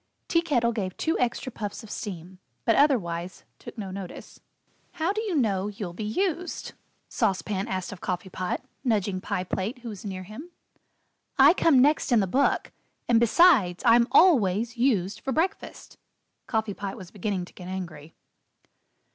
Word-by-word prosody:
Tea 335 - +3
Kettle 240 -8 +1
gave 195 -5 -4
two 320 - 0
extra 250 +1 -1
puffs 210 -1 -6
of 220 - -11
steam, 180 -2 -7 0.3
but 230 - +4
otherwise 185 - +1 0.2
took - - -11
no 195 -3 -5
notice. 190 -1 -8 0.5
"How 350 +2 0
do 430 - -2
you 410 -6 -2
know 205 -8 +1
you'll 200 -4 -6
be 195 - -6
used?" 345 - -2 0.3
Sauce 190 -2 0
Pan 200 -2 -3
asked 185 0 -3
of 200 - -10
Coffee 180 +1 -3
Pot, 185 +7 -3 0.2
nudging 205 -6 0
Pie 180 - -2
Plate 190 +6 -3
who 235 - -5
was 205 -4 -8
near 190 -3 -5
him. 215 - -10 0.9
"I - - +8
come 330 -6 +4
next 295 -1 +2
in 235 - +5
the 200 - +2
book 260 +10 +1 0.4
and, 235 -2 +4
besides, 235 - +4
I'm 235 0 +6
always 235 - +4
used 215 -6 +1
for 270 - -4
breakfast." 355 +9 -3 0.5
Coffee 220 -2 -1
Pot 195 0 -6
was 185 -2 -11
beginning 200 -2 -3
to - - -18
get 180 - -10
angry. 170 -5 -7
210 Hz, 165 wpm, -26 LUFS, 185-255 Hz, 0.9 s, I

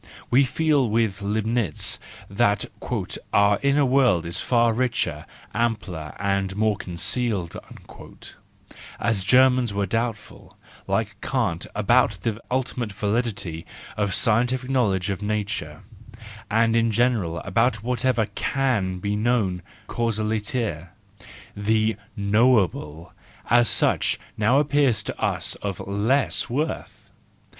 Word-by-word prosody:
We 135 +3 +5
feel 145 -3 +1
with 110 -3 0
Leibnitz 110 +2 0 0.3
that 100 0 +1 0.7
"our 100 0 +4
inner 140 +1 +3
world 125 -10 +3
is 85 - -1
far 120 -2 +2
richer, 125 +1 -1 0.3
ampler, 95 -9 -2
and 100 -1 -1
more 110 0 +2
concealed 95 +1 -1 0.7
"; - - -6 0.7
as 110 -5 0
Germans 125 -1 +4
we 100 - 0
are - - +1
doubtful, 115 +1 -4 0.3
like - - -2
Kant, - - -1
about - - +3
the 115 -1 -2
ultimate 125 -3 -2
validity 105 -5 -2 0.3
of 100 -3 0
scientific 125 +3 +1
knowledge 100 -7 +1
of 100 - -4
nature, 105 -8 -3 0.7
and 115 +1 +2
in 115 0 +3
general 110 -7 +1
about 110 +3 0
whatever 125 -1 +1
can 115 -11 0
be 100 +3 -2
known 105 -5 0 0.3
causaliter: 110 - -2 0.7
the 110 +2 +1 0.2
knowable 100 - +1 0.4
as 120 0 +5
such - - +2 0.2
now 110 +4 +3
appears 140 -7 +2
to - - -6
us - - -1
of 100 -3 -4
less 110 +8 +1
worth. 150 +7 -4
110 Hz, 115 wpm, -24 LUFS, 100-125 Hz, 0.7 s, We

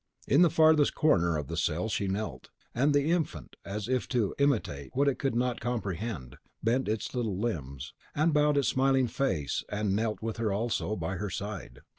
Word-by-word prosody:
In 140 - +5
the 175 - +7
farthest 155 -2 +4
corner 85 - +3
of 75 - -3
the 85 - -5
cell 85 +4 0
she 100 -2 -1
knelt; 95 -10 -4 0.2
and 140 +5 +2
the 145 +2 +2
infant, 170 -4 -2
as 105 +2 -4
if 125 -7 0
to 110 -3 0
imitate 110 - 0
what 140 +2 +3
it 140 - +1
could 135 -4 0
not 125 0 0
comprehend, 100 - -3 0.3
bent 120 +4 +1
its 110 +1 -2
little 115 -7 -1
limbs, 75 - -4 0.2
and 155 +2 +2
bowed 150 0 +3
its 140 - +2
smiling 135 0 +3
face, 110 - -1
and 105 -1 0
knelt 110 0 -1
with 110 0 -4
her 110 -2 0
also, 110 0 -1
by 90 +1 -3
her 105 +3 -3
side. 100 - -6
110 Hz, 190 wpm, -29 LUFS, 95-135 Hz, 0.3 s, the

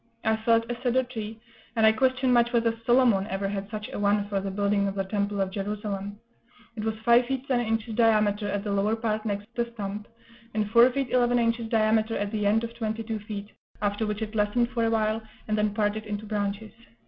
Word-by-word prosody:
I 220 -1 +2
felled 230 +1 +2
a 240 0 -5
cedar 255 0 +2
tree, 225 -3 -7 0.4
and 225 -1 +4
I 220 - +8
question 260 +2 +2
much 240 0 +4
whether 230 -1 +2
Solomon 240 -6 +4
ever 195 +1 -2
had 200 0 -4
such 215 -1 -5
a - - -4
one 205 0 +2
for 200 -1 -1
the 195 0 -3
building 200 +1 +1
of 195 - -3
the 195 - 0
Temple 200 +1 -2
of 190 -1 0
Jerusalem; 205 0 -4 0.6
it 215 - -4
was 220 0 -2
five 240 +1 +5
feet 265 0 -3
ten 255 -3 +2
inches 225 -1 -1
diameter 215 -2 +2
at 200 0 -2
the 210 - -3
lower 200 +2 +1
part 220 -1 -2
next 205 -1 -2
the 235 0 -1
stump, 205 0 -5 0.5
and 215 -1 +1
four 235 +2 +7
feet 265 -1 -2
eleven 245 -1 +3
inches 230 -1 0
diameter 220 0 +2
at 205 0 -2
the 210 -2 0
end 220 +3 +3
of 230 0 -5
twenty 225 -1 -3
two 220 -1 -3
feet; 205 -1 -7 0.3
after 205 +1 -1
which 210 +1 -2
it 215 0 -6
lessened 220 +3 +1
for 235 -2 0
a - - +2
while, 220 0 +1 0.3
and 215 - +1
then 210 -1 +1
parted 210 +1 -1
into 210 +1 -4
branches. 205 0 -3
215 Hz, 220 wpm, -27 LUFS, 205-230 Hz, 0.6 s, I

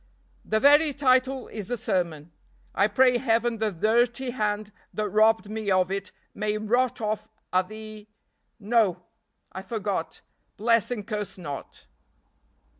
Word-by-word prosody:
The 220 - 0
very 290 +3 +5
title 260 -1 +2
is 210 -4 -6
a 245 - -1
sermon. 170 -7 -2 0.4
I 200 - +3
pray 250 +3 +4
Heaven 230 -2 +1
the 220 -1 0
dirty 240 +7 +1
hand 210 -3 -2 0.2
that 215 0 -2
robbed 215 +1 +3
me 215 -1 -4
of 185 -1 +2
it 195 -1 -3 0.2
may 210 0 -1
rot 240 +4 +1
off 215 0 -2 0.2
at 185 0 +2
the 215 -1 -9 0.5
no! 205 -5 +1 0.5
I 190 - -6
forgot. 200 -4 -3 0.4
Bless 230 0 +2
and 225 -5 -4
curse 210 -3 -4
not!" 145 -6 -8
215 Hz, 135 wpm, -26 LUFS, 200-240 Hz, 0.5 s, very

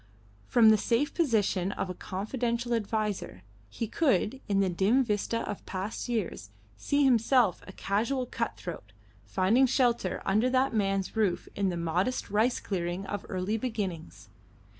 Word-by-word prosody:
From 230 -3 +6
the 215 -1 +5
safe 250 +8 +1
position 210 - +1
of - - -3
a 185 - -4
confidential 235 +6 -2
adviser, 210 - -2 0.3
he 230 - -3
could, 265 - +1
in 200 -1 +2
the 195 - +3
dim 195 +9 +2
vista 230 0 -1
of 205 - -5
past 195 +6 -4
years, 195 - -3 0.3
see 285 - +1
himself 245 -5 +3
a - - -8
casual 230 +8 -1
cut 230 -1 -3
throat 110 - -8 0.3
finding 205 - +3
shelter 240 -2 +1
under 215 +6 +2
that 260 0 +2
man's 195 -2 0
roof 210 -5 0
in 200 -1 +1
the 175 - -3
modest 180 +9 -1
rice 220 +4 +2
clearing 180 0 -3
of 205 +1 -5
early 190 +4 -1
beginnings. 185 - -5
210 Hz, 150 wpm, -29 LUFS, 190-240 Hz, 0.3 s, From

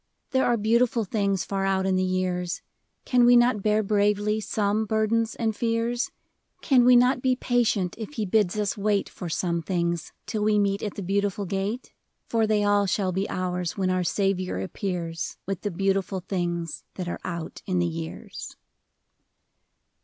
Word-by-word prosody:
There 260 -1 +2
are 240 -1 +3
beautiful 230 +2 +2
things 200 -2 0
far 195 -1 -2
out 190 -1 +1
in 190 -1 +2
the 185 - +2
years; 185 -1 -1 0.4
Can 250 -1 +4
we 245 +1 +7
not 240 -3 +4
bear 215 +1 +2
bravely 210 +1 +2
some 210 +1 0
burdens 220 +1 +1
and 220 -2 -1
fears? 230 +1 0 0.5
Can 255 -3 +5
we 250 0 +7
not 250 +1 +4
be 255 0 +2
patient 230 -8 +1
if 225 +6 -6
He 220 -6 -2
bids 205 0 +2
us 210 -1 0
wait 205 -1 +1
For 180 - -7
some 170 +1 -1
things, 170 -1 -1
till 215 - -3
we 210 0 +3
meet 200 0 +1
at 210 - -4
the 200 - -5
Beautiful 200 +1 0
Gate? 195 +6 -3 0.4
For 225 -1 +2
they 210 -1 +2
all 205 0 +3
shall 190 -1 0
be 190 +2 -2
ours 180 -1 -2
when 185 -1 +1
our 185 0 +1
Saviour 185 - 0
appears 165 - -4
With 195 -2 -3
the 205 - -1
beautiful 195 +1 0
things 175 -3 -3
that 180 -2 -4
are 175 - -4
out 170 -3 -5
in 185 -2 0
the 175 - +2
years. 165 -1 -6
200 Hz, 175 wpm, -26 LUFS, 185-220 Hz, 0.5 s, we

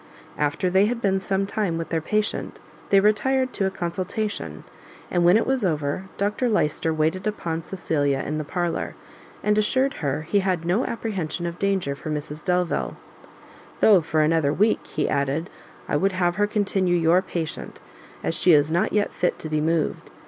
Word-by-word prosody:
After 150 +5 0
they 190 +3 +4
had 235 +1 -2
been 195 -3 +1
some 195 0 0
time 195 -4 -1
with 165 - -4
their 165 -1 0
patient, 210 +6 -1 0.3
they 195 - +6
retired 255 +6 +2
to 195 - 0
a - - +1
consultation, 185 - -4 0.5
and 175 - +2
when 175 +4 +6
it 225 - +1
was 265 -3 0
over, 155 0 -1
Dr 210 +5 0
Lyster 160 -5 +1
waited 160 +5 0
upon 165 -6 -2
Cecilia 150 -6 -1
in 155 +2 -2
the - - -2
parlour, 175 +3 -2 0.5
and 210 0 +3
assured 260 +6 +2
her 145 +1 -1
he 200 +6 +1
had 185 -4 -1
no 185 +9 +1
apprehension 185 -8 -3
of 170 0 -5
danger 195 -8 0
for 140 +3 -7
Mrs 150 0 -4
Delvile, 180 -2 0 0.8
"Though, 200 -5 +6
for 155 0 0
another 155 -2 +2
week," 210 +8 +1
he 150 - -1
added, 140 +4 -1 0.4
"I - - +1
would 195 +5 +1
have 175 -1 0
her 205 0 +3
continue 195 -4 +1
your 170 +2 +4
patient, 170 -4 -5 0.4
as - - 0
she 175 +1 +4
is 150 +1 +4
not 170 +2 +1
yet 205 -1 +1
fit 180 - 0
to 155 - -7
be 155 0 0
removed. 160 0 -1
180 Hz, 180 wpm, -24 LUFS, 155-205 Hz, 0.8 s, they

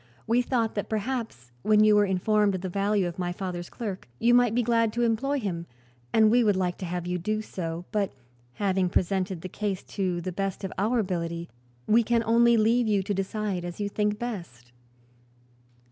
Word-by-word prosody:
We 235 +2 +3
thought 240 -3 0
that 205 - -3
perhaps, 220 - -3
when 215 +4 +4
you 215 -1 +6
were 205 0 +5
informed 200 +2 +2
of 185 - -4
the 185 - -3
value 200 0 +1
of 175 +1 -7
my 175 -1 -1
father's 175 -1 -5
clerk, 200 - -6
you 240 - +3
might 245 -2 +4
be 245 - +2
glad 230 -1 +2
to 240 - 0
employ 260 +5 +1
him, 170 -7 -4 0.4
and 220 -1 +5
we 245 +1 +5
would 205 -3 +3
like 180 -1 -1
to 185 - -4
have 175 0 -3
you 180 0 -2
do 215 +5 -2
so; 170 -3 -5
but 205 -2 0 0.4
having 190 -1 +1
presented 185 -1 0
the 185 - -5
case 200 0 -3
to 185 -3 -2
the 185 +2 -4
best 195 +1 -3
of 190 - -4
our 220 +6 +1
ability 170 -5 -2 0.4
we 230 +2 +5
can 235 0 +1
only 235 +1 +4
leave 230 +2 +3
you 205 -2 +2
to 205 - -2
decide 195 -1 -2
as 175 +2 -6
you 205 - -1
think 210 0 0
best." 170 - -6
200 Hz, 200 wpm, -27 LUFS, 180-225 Hz, 0.4 s, you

